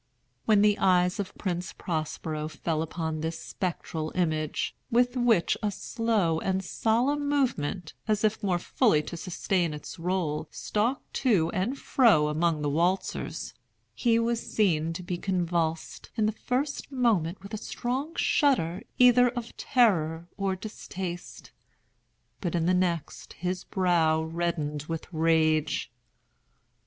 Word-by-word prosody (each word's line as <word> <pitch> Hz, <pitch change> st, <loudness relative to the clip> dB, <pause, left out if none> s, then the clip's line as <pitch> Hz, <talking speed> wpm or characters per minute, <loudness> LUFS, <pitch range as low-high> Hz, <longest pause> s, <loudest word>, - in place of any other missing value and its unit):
When 210 Hz, -2 st, +5 dB
the 210 Hz, 0 st, +4 dB
eyes 180 Hz, -1 st, +3 dB
of 195 Hz, -2 st, -4 dB
Prince 180 Hz, -2 st, -3 dB
Prospero 155 Hz, -2 st, -3 dB
fell 160 Hz, 0 st, -2 dB
upon 160 Hz, -1 st, -3 dB
this 160 Hz, +1 st, -2 dB
spectral 160 Hz, -4 st, -4 dB
image 155 Hz, -4 st, 0 dB, 0.2 s
(which 245 Hz, +2 st, +3 dB
with 235 Hz, -8 st, +3 dB
a 210 Hz, -, +1 dB
slow 205 Hz, -5 st, 0 dB
and 190 Hz, +1 st, -1 dB
solemn 265 Hz, +9 st, +1 dB
movement, 195 Hz, -, 0 dB
as 215 Hz, -1 st, +1 dB
if 215 Hz, 0 st, +1 dB
more 190 Hz, -4 st, +1 dB
fully 175 Hz, -, +2 dB
to 170 Hz, -, -6 dB
sustain 175 Hz, -1 st, -1 dB
its 150 Hz, +4 st, -9 dB
role, 165 Hz, -3 st, -1 dB
stalked 230 Hz, +6 st, -2 dB
to 175 Hz, -9 st, +3 dB
and 220 Hz, +9 st, -1 dB
fro 210 Hz, -, +4 dB
among 155 Hz, 0 st, +1 dB
the -, -, +1 dB
waltzers) 175 Hz, +5 st, -1 dB, 0.4 s
he 230 Hz, -2 st, +2 dB
was 230 Hz, 0 st, +1 dB
seen 165 Hz, -6 st, +1 dB
to 180 Hz, -, -6 dB
be 175 Hz, -1 st, -3 dB
convulsed, 170 Hz, -4 st, -1 dB
in 220 Hz, -2 st, +2 dB
the 215 Hz, -, +2 dB
first 265 Hz, +7 st, -2 dB
moment 205 Hz, -, +1 dB
with 200 Hz, +2 st, -10 dB
a -, -, -1 dB
strong 260 Hz, +9 st, -3 dB
shudder 190 Hz, -, +2 dB, 0.2 s
either 250 Hz, 0 st, +6 dB
of 240 Hz, -1 st, -6 dB
terror 170 Hz, -, +2 dB
or 195 Hz, -1 st, -1 dB
distaste; 185 Hz, -3 st, -7 dB, 0.9 s
but, 175 Hz, -3 st, -2 dB
in 165 Hz, -1 st, +1 dB
the 180 Hz, -, +3 dB
next, 175 Hz, -4 st, -1 dB
his 180 Hz, +1 st, -3 dB
brow 165 Hz, -4 st, +2 dB
reddened 160 Hz, -3 st, -2 dB
with 165 Hz, -1 st, -3 dB
rage. 155 Hz, -4 st, +2 dB
180 Hz, 135 wpm, -28 LUFS, 160-220 Hz, 0.9 s, either